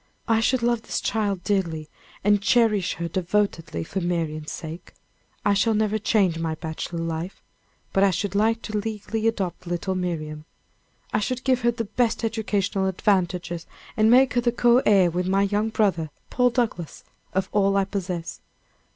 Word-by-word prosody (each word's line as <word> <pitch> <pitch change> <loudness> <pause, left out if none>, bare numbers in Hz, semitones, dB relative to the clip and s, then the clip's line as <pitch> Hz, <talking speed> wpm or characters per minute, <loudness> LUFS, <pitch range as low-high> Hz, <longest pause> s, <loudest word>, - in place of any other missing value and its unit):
I 225 -1 +3
should 235 +2 +1
love 235 -1 +2
this - - -3
child 200 -5 -1
dearly, 170 -7 -1 0.4
and 205 0 +4
cherish 215 -3 +3
her 170 0 -3
devotedly 175 - -1
for 190 - -4
Marian's 160 -3 -2
sake. 165 +2 -8 0.5
I 205 - +4
shall 220 +3 +2
never 215 0 +1
change 195 -6 +2
my 165 -1 -2
bachelor 160 +2 -5
life 165 +3 -5 0.5
but 195 - +4
I 200 - +6
should 195 +1 -2
like 225 +3 +2
to 215 -1 -3
legally 220 +1 -2
adopt 190 -6 -2
little 175 +2 -2
Miriam. 155 -4 -3 0.7
I - - +3
should 255 +4 -2
give 255 -2 +2
her 240 - +3
the 230 -1 -4
best 230 +3 0
educational 205 -3 0
advantages, 180 -3 0 0.3
and 215 0 +4
make 255 +2 +6
her 245 - +2
the 240 0 +2
co 240 +1 +4
heir 190 -4 +5
with 180 +2 -1
my 195 +1 +3
young 210 +2 +1
brother, 190 -8 +1 0.2
Paul 250 0 +3
Douglass, 230 - -2 0.3
of 190 0 0
all 200 -1 +3
I 195 - +3
possess. 180 -4 -4
200 Hz, 170 wpm, -24 LUFS, 175-220 Hz, 0.7 s, I